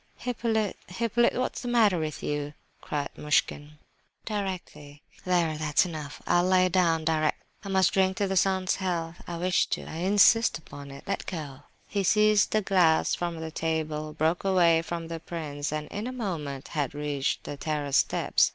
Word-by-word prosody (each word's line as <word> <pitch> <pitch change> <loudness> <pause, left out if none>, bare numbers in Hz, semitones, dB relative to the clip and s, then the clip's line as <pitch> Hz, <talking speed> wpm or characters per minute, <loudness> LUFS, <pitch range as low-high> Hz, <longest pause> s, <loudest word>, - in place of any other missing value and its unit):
"Hippolyte, 225 -4 -1
Hippolyte, 230 +5 +1
what 255 - -1
is - - -5
the 245 - -6
matter 220 -7 +3
with 155 -1 -4
you?" 145 0 -3 0.3
cried 145 -1 -3
Muishkin. 150 0 0 0.5
"Directly! 180 -8 -5 0.2
There, 170 -4 +1
that's 150 +2 +2
enough. 155 -4 -7
I'll 175 0 +3
lie 185 0 +4
down 165 -3 +2
directly. 155 -1 0 0.2
I 200 - -6
must 190 -1 +3
drink 190 -1 +2
to 200 - +1
the 190 - -1
sun's 190 0 +2
health. 170 -3 -3
I 170 - -4
wish 180 +1 +2
to—I 160 - -4
insist 205 +5 +4
upon 145 -2 -11
it! 140 0 -10
Let - - -3
go!" 145 -6 -6 0.2
He 200 -1 -1
seized 210 +1 +4
a 215 - +3
glass 180 -5 +3
from 170 -2 -2
the 160 0 -5
table, 155 -1 -2
broke 160 +3 0
away 175 -4 +4
from 165 0 -5
the 165 0 -5
prince, 150 -4 -5
and 155 0 -3
in 210 +4 -4
a - - -3
moment 160 - -4
had 145 -3 -2
reached 145 -2 -2
the - - -6
terrace 145 -1 -1
steps. - - +2
170 Hz, 175 wpm, -27 LUFS, 150-190 Hz, 0.5 s, lie